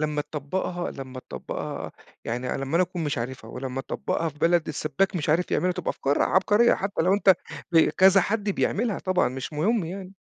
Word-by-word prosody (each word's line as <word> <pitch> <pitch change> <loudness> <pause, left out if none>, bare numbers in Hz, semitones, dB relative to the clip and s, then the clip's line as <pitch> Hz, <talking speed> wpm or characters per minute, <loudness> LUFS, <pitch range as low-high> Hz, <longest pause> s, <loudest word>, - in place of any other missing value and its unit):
لمّا 150 -1 0
تطبّقها 175 +5 -3
لمّا 130 -1 -8
تطبّقها - - -6 0.3
يعني 125 +2 -2
أنا 135 - -2
لمّا 135 +4 -4
أنا 180 - +5
أكون 175 -2 -3
مش 145 -2 -1
عارفها 115 -1 -5
ولمّا 130 +1 -4
تطبّقها 165 +4 -2
في 150 -1 -12
بلد 170 0 +2
السبّاك 180 +6 0
مش 155 - -3
عارف 165 +4 +2
يعملها، 180 0 +1
تبقى 180 0 -2
أفكار 140 +1 0
عبقرية 210 +5 +4
حتى 195 -3 -2
لو 185 +3 +3
أنت 200 -2 +5 0.4
ب 165 - +6
كذا 190 +1 +6
حد 205 +2 -1
بيعملها 215 +2 0
طبعًا، 185 -1 +1
مش 130 +4 -6
مُهم 190 +7 +1
يعني. 185 +3 -7
170 Hz, 195 wpm, -25 LUFS, 140-190 Hz, 0.4 s, ب